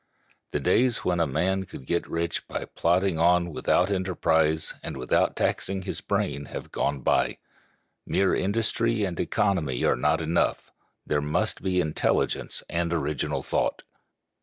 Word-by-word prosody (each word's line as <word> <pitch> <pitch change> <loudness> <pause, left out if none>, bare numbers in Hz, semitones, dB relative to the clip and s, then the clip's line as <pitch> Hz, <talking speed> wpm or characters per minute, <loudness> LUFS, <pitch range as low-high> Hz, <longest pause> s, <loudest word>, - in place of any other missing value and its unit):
The - - -1
days 125 -2 +2
when 90 -1 +1
a 85 - +2
man 95 +7 0
could 65 - -10
get 85 +5 -1
rich 85 0 -2
by - - -4
plodding 90 0 +1
on 85 +1 +3
without 90 +5 +2
enterprise 80 -4 +1
and - - -5
without 65 -1 +1
taxing 95 0 -1
his - - -4
brains 70 0 -2
have - - -7
gone 70 - -1
by. - - +2 0.7
Mere 95 -1 +2
industry 115 +2 +1
and 90 -4 -3
economy 85 -12 0
are - - +4
not 80 - +2
enough; 80 +1 0 0.3
there 75 -1 0
must 75 +1 0
be 90 -1 +1
intelligence 80 -3 0
and 85 +1 -1
original 75 -4 -1
thought. - - -1
85 Hz, 145 wpm, -26 LUFS, 80-95 Hz, 0.7 s, are